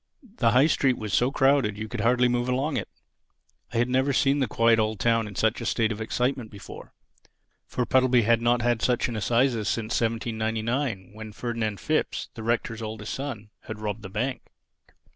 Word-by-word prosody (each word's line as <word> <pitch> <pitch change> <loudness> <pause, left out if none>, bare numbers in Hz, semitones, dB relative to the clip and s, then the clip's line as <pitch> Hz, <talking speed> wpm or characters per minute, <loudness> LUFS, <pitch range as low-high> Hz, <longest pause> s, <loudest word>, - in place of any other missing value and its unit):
The 115 - +3
High 130 +3 +6
Street 135 -5 +2
was 110 -2 -5
so 125 - +3
crowded 135 -7 +2
you 110 +1 -5
could - - -4
hardly 125 +1 +3
move 120 0 0
along 135 +4 0
it. - - -3 0.8
I 120 - -3
had 120 +1 +2
never 130 +2 +1
seen 135 +2 +2
the 130 - +1
quiet 115 0 +3
old 110 -1 0
town 115 +2 +2
in 100 - -9
such 110 +2 +1
a - - -4
state 115 -1 +1
of 110 0 -5
excitement 125 +1 -1
before. 100 -2 -11 0.7
For 125 - -2
Puddleby 130 -1 +3
had 115 +1 +3
not 120 0 +2
had 120 -2 +1
such 125 -1 +1
an 120 - -4
Assizes 115 0 +1
since 115 0 -1
1799, 115 -1 -2
when 110 0 -9
Ferdinand 110 -3 -3
Phipps, - - -1
the - - -8
Rector's 115 0 -1
oldest 110 -1 -5
son, 120 -7 -6
had 110 - -6
robbed 105 0 -4
the 95 - -8
bank. 125 +6 -2
115 Hz, 190 wpm, -26 LUFS, 110-125 Hz, 0.8 s, High